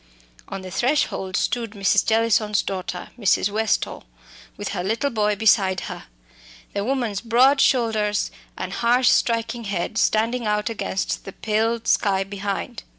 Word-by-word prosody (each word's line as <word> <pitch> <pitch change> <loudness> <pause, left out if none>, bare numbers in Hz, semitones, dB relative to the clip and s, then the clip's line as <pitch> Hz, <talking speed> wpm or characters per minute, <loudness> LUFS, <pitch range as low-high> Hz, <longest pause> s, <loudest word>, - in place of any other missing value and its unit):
On 195 -1 -6
the 185 - -8
threshold 195 -4 0
stood 230 -3 -1
Mrs. 195 -3 +2
Jellison's 220 -2 +2
daughter, 185 -2 -5
Mrs. 200 -1 +2
Westall, 220 0 -1 0.5
with 205 - -4
her 180 -3 -3
little 225 +8 -1
boy 210 -2 +1
beside 195 -3 +3
her, - - -7 0.7
the 200 - -1
woman's 235 -5 -1
broad 255 +4 +4
shoulders 220 -4 +1 0.3
and - - -5
harsh 245 +2 +3
striking 230 0 +1
head 200 +2 -2
standing 230 +2 +1
out 210 +2 0
against 200 -3 -3
the 195 - -8
pale 225 +2 0
sky 195 -2 +2
behind. 200 0 -4
215 Hz, 140 wpm, -23 LUFS, 200-230 Hz, 0.7 s, broad